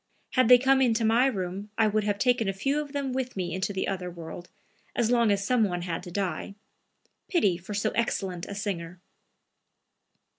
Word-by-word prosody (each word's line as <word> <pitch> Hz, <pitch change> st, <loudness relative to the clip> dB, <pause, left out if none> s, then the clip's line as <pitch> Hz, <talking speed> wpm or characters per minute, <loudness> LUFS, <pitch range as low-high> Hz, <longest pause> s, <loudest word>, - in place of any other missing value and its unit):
Had 255 Hz, -3 st, +3 dB
they 250 Hz, -, +10 dB
come 265 Hz, +1 st, +3 dB
into 230 Hz, -3 st, +2 dB
my 235 Hz, +4 st, +4 dB
room, 195 Hz, -3 st, -3 dB
I 225 Hz, -, +4 dB
would 215 Hz, 0 st, +1 dB
have 205 Hz, -1 st, 0 dB
taken 240 Hz, -2 st, +2 dB
a -, -, -1 dB
few 275 Hz, +10 st, 0 dB
of 290 Hz, -2 st, -8 dB
them 280 Hz, -2 st, -2 dB
with 255 Hz, -3 st, -3 dB
me 175 Hz, -3 st, -2 dB
into 190 Hz, +2 st, -1 dB
the 190 Hz, -1 st, -2 dB
other 185 Hz, -2 st, -3 dB
world, 170 Hz, 0 st, -9 dB, 0.5 s
as 235 Hz, -1 st, +1 dB
long 235 Hz, -2 st, +4 dB
as 200 Hz, -1 st, 0 dB
some 245 Hz, 0 st, +3 dB
one 175 Hz, -4 st, -1 dB
had 170 Hz, -1 st, -3 dB
to 180 Hz, -, -9 dB
die. 195 Hz, +1 st, -3 dB, 0.7 s
Pity 210 Hz, -, +2 dB
for 185 Hz, +4 st, -7 dB
so 210 Hz, +2 st, 0 dB
excellent 190 Hz, -6 st, -2 dB
a 200 Hz, -, -6 dB
singer!" 180 Hz, -4 st, -4 dB
205 Hz, 195 wpm, -27 LUFS, 185-245 Hz, 0.7 s, they